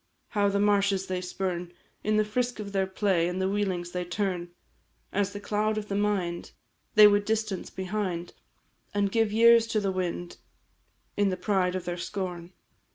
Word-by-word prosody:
How 205 -2 +2
the 200 0 0
marshes 200 -2 +2
they 185 -1 -3
spurn, 180 -1 -3 0.3
In 215 0 +2
the 215 - +3
frisk 240 +2 -1
of 205 -1 -5
their 195 -1 +1
play, 190 -3 +1
And 180 +1 -3
the 190 - +1
wheelings 190 -3 -1
they 180 0 -2
turn, 175 -1 -2 0.6
As 200 0 +1
the 205 - -6
cloud 215 +1 0
of 210 -1 -4
the 200 - -1
mind 195 -4 -1 0.4
They 215 0 +10
would 205 0 +5
distance 215 -3 -2
behind, 185 -2 -3 0.6
And 200 -1 +1
give 225 -1 +2
years 230 +1 +6
to 220 - 0
the 195 -2 0
wind, 175 -1 -3 0.8
In 205 -1 +3
the 185 - -2
pride 185 -1 +1
of 185 -1 -4
their 175 0 -3
scorn! 180 -2 -5
195 Hz, 175 wpm, -28 LUFS, 180-210 Hz, 0.8 s, They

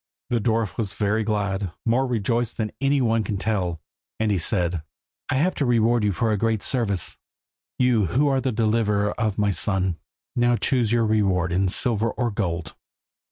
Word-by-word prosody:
The 120 -2 +1
dwarf 110 -2 0
was 110 -3 -2
very 105 +1 0
glad, 100 -4 -2
more 125 +3 +2
rejoiced 115 0 -1
than 110 -2 -2
any 140 0 +2
one 115 -2 +2
can 100 0 -3
tell, 95 -5 -1 0.4
and 110 -1 +1
he 100 - +1
said 85 -1 0 0.5
"I - - +1
have 165 +8 +2
to - - +3
reward 120 -1 +3
you 105 - +2
for 110 +4 0
a 105 - +1
great 110 -1 0
service, 105 -8 0 0.6
you 120 -6 +3
who 135 - +2
are 135 -1 +2
the 130 - 0
deliverer 105 -2 +1
of 110 -4 0
my 105 -1 +2
son. 95 -1 0 0.4
Now 120 0 +3
choose 120 -2 +1
your 120 -1 +3
reward 95 -5 +1
in 95 +2 +2
silver 115 +3 +1
or 120 -1 -2
gold." 85 -6 -3
110 Hz, 180 wpm, -24 LUFS, 100-120 Hz, 0.6 s, to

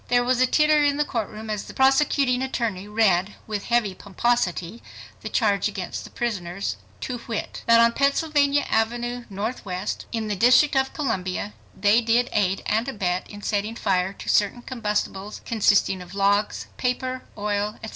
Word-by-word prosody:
There 245 0 +3
was 250 0 +1
a 255 - +5
titter 300 +2 +4
in 285 -1 +2
the 295 - +1
court 230 -7 -3
room 215 +1 -9
as 210 -2 -3
the - - -11
prosecuting 270 -1 +3
attorney 230 -7 -2
read 210 -3 +2
with 210 -2 -4
heavy 235 -5 +1
pomposity 200 -2 -1 0.4
the - - -5
charge 205 -4 +2
against 195 -4 -5
the - - -10
prisoners 200 -5 -3 0.2
"to 245 -2 -4
wit: 225 -2 -4
That 230 0 +7
on 230 0 +6
Pennsylvania 285 +1 +2
Avenue, 240 +2 -1
Northwest, 200 -2 -4
in 225 -2 -2
the 210 - -1
District 255 +8 +5
of 265 0 +2
Columbia 200 -7 -2 0.3
they 210 +3 +4
did 235 +2 +2
aid 195 -2 +1
and 220 +4 0
abet 185 -8 -2
in 205 0 -10
setting 210 +2 -1
fire 185 -3 0
to - - -11
certain 210 +4 +2
combustibles 210 -4 -3
consisting 200 -4 +2
of 180 +2 -11
logs, 200 +1 +1
paper, 255 0 -2
oil, 205 +1 -1
etc. 220 - -5
220 Hz, 165 wpm, -24 LUFS, 200-250 Hz, 0.4 s, That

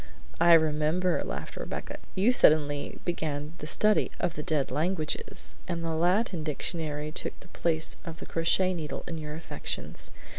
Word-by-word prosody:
"I 170 - +7
remember," 160 +3 +3
laughed - - -5
Rebecca. - - -5 0.2
"You 200 +6 +4
suddenly 145 - +4
began 155 -3 -2
the 150 - -5
study 210 +6 +4
of 175 -2 0
the 150 - -4
dead 150 -4 0
languages, 155 +2 -1
and 170 -2 -2
the 165 - -1
Latin 175 +2 +1
dictionary 155 -1 -2
took - - -3
the - - -15
place 160 -2 0
of 165 -2 -7
the - - -8
crochet 185 +3 +2
needle 155 -5 -4
in 165 -2 -4
your 150 -1 -5
affections. 160 - -5
160 Hz, 155 wpm, -29 LUFS, 150-175 Hz, 0.2 s, I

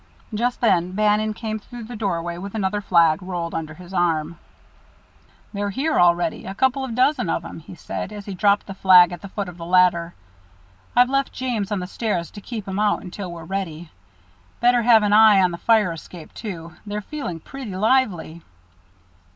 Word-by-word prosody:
Just 240 +3 -1
then 185 -6 +2
Bannon 210 +1 +1
came 220 -1 -4
through 240 +2 -10
the 240 +2 -8
doorway 175 -5 -2
with 200 +3 -7
another 205 0 -1
flag 170 -4 +3
rolled 175 -2 -4
under 155 -1 -4
his 180 +1 -12
arm. 170 -2 0 1.1
"They're 205 0 -2
here 290 +10 0
already, 175 -1 +2
a 190 - -6
couple 265 +4 +1
of 245 -4 -4
dozen 255 - +2
of 165 - -1
'em," 165 - -8
he 165 - -12
said, 185 - -6
as 205 -1 -8
he 200 - -6
dropped 200 +2 +2
the 195 - -7
flag 185 -2 +6
at 175 -2 -7
the 200 - -9
foot 200 0 -4
of 180 -1 -9
the - - -6
ladder. 175 -2 +3 0.8
"I've 245 +1 +5
left 275 0 +1
James 230 -6 -3
on 205 -3 -1
the - - -4
stairs 185 -3 -3
to 205 - -10
keep 220 -2 -7
'em 190 +1 -3
out 210 -1 +1
until 185 0 -7
we're 170 -1 -8
ready. 175 -4 -5 0.7
Better 245 0 +4
have 225 -2 +5
an 205 0 +2
eye 215 -2 +7
on 185 -1 +3
the 170 - -6
fire 220 -6 +3
escape, 165 0 -10
too 170 -6 -7
they're 210 0 -4
feeling 205 - -6
pretty 245 +1 -8
lively." 195 -7 +1
195 Hz, 190 wpm, -22 LUFS, 175-220 Hz, 1.1 s, eye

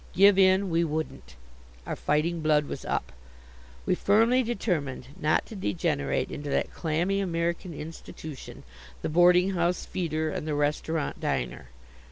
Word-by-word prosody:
Give 195 +2 +6
in, 190 0 +4
we 165 +1 +3
wouldn't. 150 - -4 0.5
Our - - -3
fighting 160 +3 0
blood 150 -1 +3
was - - -6
up. - - -2 0.7
We - - +2
firmly 225 +7 +4
determined 160 - -2
not 155 -4 +1
to 220 - -10
degenerate 90 - -1
into 145 0 -5
that - - -1
clammy 175 +5 0
American 170 -1 -1
institution, 155 -2 -9 0.4
the - - -1
boarding 180 +3 +5
house 175 -1 0
feeder 160 -3 -2
and 150 - -4
the 150 - -1
restaurant 150 +1 -1
diner. - - -2
165 Hz, 140 wpm, -27 LUFS, 150-185 Hz, 0.7 s, Give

